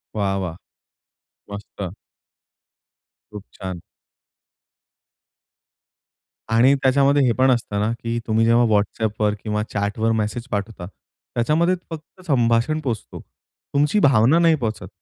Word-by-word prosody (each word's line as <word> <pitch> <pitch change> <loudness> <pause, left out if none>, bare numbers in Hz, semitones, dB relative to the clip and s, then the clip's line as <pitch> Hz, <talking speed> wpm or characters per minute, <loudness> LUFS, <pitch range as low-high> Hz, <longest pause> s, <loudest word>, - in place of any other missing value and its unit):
वाह 100 -2 0
वाह! 90 -4 -4 1.0
मस्त. 100 -2 -7 1.4
खूप 105 -2 -9
छान. 95 -3 -7 2.7
आणि 125 +5 +5
त्याच्यामध्ये 140 +1 +3
हे 125 - +3
पण 130 +2 +3
असतं 115 -4 -1
ना, 105 +2 0
की 115 0 -3
तुम्ही 110 0 +2
जेव्हा 120 +1 +4
WhatsAppवर 105 0 -1
किंवा 105 -1 -1
चॅटवर 105 +2 0
मेसेज 110 +3 -2
पाठवता. 100 -3 -4 0.5
त्याच्यामध्ये 155 +9 +2 0.2
फक्त 160 +3 -10
संभाषण 120 +2 +2
पोहचतो. 115 -5 -4 0.5
तुमची 150 +8 +2
भावना 135 +4 +4
नाही 165 -1 +4
पोहचत 110 -5 -3
115 Hz, 110 wpm, -21 LUFS, 105-135 Hz, 2.7 s, आणि